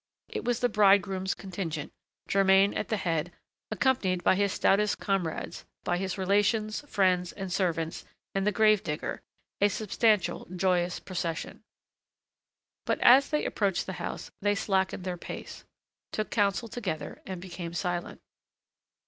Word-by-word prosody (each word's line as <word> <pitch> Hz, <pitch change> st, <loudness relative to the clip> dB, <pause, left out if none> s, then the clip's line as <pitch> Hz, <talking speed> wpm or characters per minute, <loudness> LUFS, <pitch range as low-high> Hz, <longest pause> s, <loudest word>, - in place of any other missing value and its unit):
It -, -, -4 dB
was 245 Hz, -1 st, 0 dB
the 245 Hz, -, +4 dB
bridegroom's 195 Hz, -3 st, +3 dB
contingent, 175 Hz, -6 st, -5 dB, 0.3 s
Germain 195 Hz, 0 st, +4 dB
at -, -, -2 dB
the 220 Hz, -, 0 dB
head, 170 Hz, -2 st, -1 dB, 0.4 s
accompanied 195 Hz, -10 st, +1 dB
by -, -, +5 dB
his 200 Hz, +1 st, +1 dB
stoutest 205 Hz, +3 st, +2 dB
comrades, 185 Hz, -5 st, -2 dB, 0.2 s
by 175 Hz, -, 0 dB
his 190 Hz, +1 st, -3 dB
relations, 205 Hz, +3 st, +1 dB
friends, 180 Hz, -3 st, +2 dB
and 190 Hz, -3 st, -5 dB
servants 165 Hz, -4 st, -1 dB, 0.3 s
and 195 Hz, +1 st, 0 dB
the -, -, +4 dB
grave 215 Hz, -2 st, +4 dB
digger, 150 Hz, -1 st, -3 dB, 0.4 s
a 205 Hz, -, +6 dB
substantial, 215 Hz, 0 st, +1 dB
joyous 180 Hz, -1 st, +1 dB
procession. 170 Hz, -2 st, -4 dB, 1.3 s
But, -, -, +1 dB
as 270 Hz, +3 st, +7 dB
they 300 Hz, -, 0 dB
approached 195 Hz, -4 st, 0 dB
the 190 Hz, -, -5 dB
house, -, -, -5 dB
they 205 Hz, 0 st, +2 dB
slackened 190 Hz, -2 st, 0 dB
their 180 Hz, -1 st, -3 dB
pace, -, -, -8 dB, 0.5 s
took 215 Hz, -, -3 dB
counsel 205 Hz, +1 st, +1 dB
together, 185 Hz, -10 st, -5 dB
and 190 Hz, -2 st, -5 dB
became 175 Hz, -2 st, -7 dB
silent. 175 Hz, -1 st, -3 dB
195 Hz, 140 wpm, -29 LUFS, 180-205 Hz, 1.3 s, as